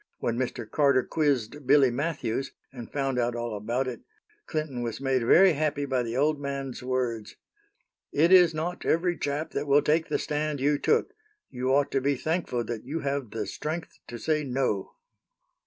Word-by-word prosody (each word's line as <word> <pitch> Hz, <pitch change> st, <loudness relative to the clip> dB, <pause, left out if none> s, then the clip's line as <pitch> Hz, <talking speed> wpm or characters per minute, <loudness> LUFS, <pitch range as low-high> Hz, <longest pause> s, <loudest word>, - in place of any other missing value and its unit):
When 115 Hz, -, -1 dB
Mr. 125 Hz, +1 st, -3 dB
Carter 140 Hz, -4 st, +3 dB
quizzed 145 Hz, -2 st, -1 dB
Billy 135 Hz, -2 st, +6 dB
Matthews, 135 Hz, -2 st, -2 dB, 0.2 s
and 120 Hz, -3 st, -9 dB
found 135 Hz, -3 st, -1 dB
out 120 Hz, 0 st, 0 dB
all 120 Hz, -2 st, -3 dB
about 120 Hz, +6 st, -2 dB
it, 125 Hz, -, -5 dB, 0.5 s
Clinton 155 Hz, -6 st, -3 dB
was 115 Hz, -2 st, -4 dB
made 135 Hz, -2 st, +1 dB
very 185 Hz, +9 st, +6 dB
happy 150 Hz, -1 st, -1 dB
by 130 Hz, -2 st, 0 dB
the 120 Hz, 0 st, -3 dB
old 150 Hz, +1 st, +1 dB
man's 140 Hz, -2 st, -4 dB
words: 125 Hz, -4 st, -2 dB, 0.8 s
"It 165 Hz, +5 st, +3 dB
is 180 Hz, -3 st, +7 dB
not 165 Hz, +3 st, -4 dB
every 175 Hz, +2 st, +1 dB
chap 145 Hz, +1 st, -3 dB
that 145 Hz, -, -3 dB
will 140 Hz, +1 st, +4 dB
take 160 Hz, +2 st, +2 dB
the -, -, +1 dB
stand 150 Hz, -1 st, -2 dB
you 145 Hz, +2 st, +2 dB
took. 450 Hz, +1 st, +1 dB, 0.4 s
You 125 Hz, 0 st, -2 dB
ought 140 Hz, +1 st, +2 dB
to 135 Hz, -, +1 dB
be 140 Hz, +1 st, +1 dB
thankful 155 Hz, -4 st, -1 dB
that 115 Hz, -1 st, -5 dB
you 155 Hz, +5 st, -4 dB
have 140 Hz, -3 st, -2 dB
the 110 Hz, -, -4 dB
strength 160 Hz, +2 st, -5 dB
to 120 Hz, -, -7 dB
say 150 Hz, +6 st, 0 dB
No." 125 Hz, -7 st, -1 dB
140 Hz, 180 wpm, -27 LUFS, 125-150 Hz, 0.8 s, is